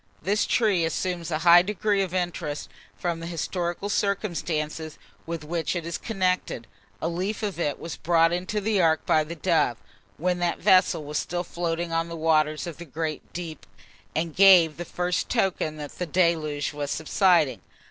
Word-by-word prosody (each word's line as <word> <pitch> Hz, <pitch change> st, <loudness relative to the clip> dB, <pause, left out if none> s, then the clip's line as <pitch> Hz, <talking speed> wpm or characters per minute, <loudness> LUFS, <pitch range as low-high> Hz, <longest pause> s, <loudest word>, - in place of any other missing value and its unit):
This 205 Hz, +2 st, +1 dB
tree 205 Hz, -7 st, +2 dB
assumes 170 Hz, +1 st, -2 dB
a 155 Hz, -, 0 dB
high 175 Hz, 0 st, +9 dB
degree 205 Hz, +1 st, 0 dB
of 190 Hz, -3 st, -2 dB
interest 175 Hz, -5 st, -3 dB, 0.3 s
from 170 Hz, -2 st, -2 dB
the 165 Hz, -, -6 dB
historical 175 Hz, +2 st, -3 dB
circumstances 165 Hz, -7 st, -2 dB, 0.3 s
with 165 Hz, -1 st, -4 dB
which 165 Hz, +3 st, -2 dB
it 170 Hz, -2 st, -3 dB
is 170 Hz, 0 st, -4 dB
connected. 185 Hz, -, -1 dB, 0.4 s
A -, -, +1 dB
leaf 185 Hz, +6 st, -3 dB
of 200 Hz, -4 st, -3 dB
it 145 Hz, -4 st, -1 dB
was 165 Hz, -, -6 dB
brought 165 Hz, 0 st, +3 dB
into 185 Hz, +4 st, -2 dB
the 205 Hz, -1 st, +1 dB
ark 160 Hz, -2 st, +2 dB
by 155 Hz, -, +3 dB
the 165 Hz, +3 st, -7 dB
dove, 155 Hz, -8 st, +1 dB, 0.4 s
when 180 Hz, +2 st, 0 dB
that 175 Hz, -1 st, 0 dB
vessel 185 Hz, -5 st, +4 dB
was 150 Hz, +1 st, -2 dB
still 175 Hz, 0 st, -3 dB
floating 170 Hz, -1 st, -3 dB
on 165 Hz, 0 st, 0 dB
the 170 Hz, -, -5 dB
waters 155 Hz, -1 st, +2 dB
of 170 Hz, -3 st, -7 dB
the 170 Hz, -, -9 dB
great 155 Hz, +1 st, -5 dB
deep, 165 Hz, -4 st, -7 dB, 0.5 s
and 160 Hz, 0 st, -2 dB
gave 180 Hz, -5 st, +7 dB
the 175 Hz, -, -5 dB
first 180 Hz, 0 st, -2 dB
token 185 Hz, -8 st, 0 dB
that 145 Hz, -1 st, -7 dB
the 180 Hz, -, -2 dB
deluge 155 Hz, -4 st, +1 dB
was 145 Hz, -1 st, -4 dB
subsiding. 160 Hz, -2 st, +2 dB
170 Hz, 175 wpm, -26 LUFS, 160-185 Hz, 0.5 s, high